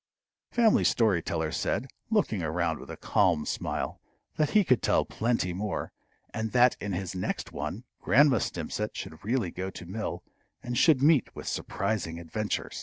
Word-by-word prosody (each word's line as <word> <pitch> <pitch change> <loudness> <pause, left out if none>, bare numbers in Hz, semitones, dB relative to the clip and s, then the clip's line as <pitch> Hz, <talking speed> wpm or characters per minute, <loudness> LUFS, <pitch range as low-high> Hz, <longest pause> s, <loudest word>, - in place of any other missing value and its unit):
Family 230 -3 +4
Story 105 -7 +3
Teller 80 -1 -2
said, 130 - -1 0.2
looking 200 - +1
around 80 0 -1
with - - -11
a - - -7
calm 90 -8 +2
smile, - - -3 0.3
that 150 -1 +2
he 210 - +6
could 130 -8 +3
tell - - +2
plenty 110 -6 0
more, 105 +3 -3 0.4
and 110 0 -3
that 125 0 +5
in 100 -2 -3
his 90 0 -3
next 95 0 -3
one - - -4 0.2
Grandma 135 -1 +5
Stimpcett 95 +6 -3
should 80 - -7
really 110 -4 0
go 95 +1 -4
to 90 - -9
mill, 105 +6 -4 0.4
and 120 0 -3
should 140 0 +5
meet 150 -4 +4
with - - -8
surprising 95 -5 -2
adventures. 100 +6 -3
105 Hz, 165 wpm, -28 LUFS, 90-125 Hz, 0.4 s, he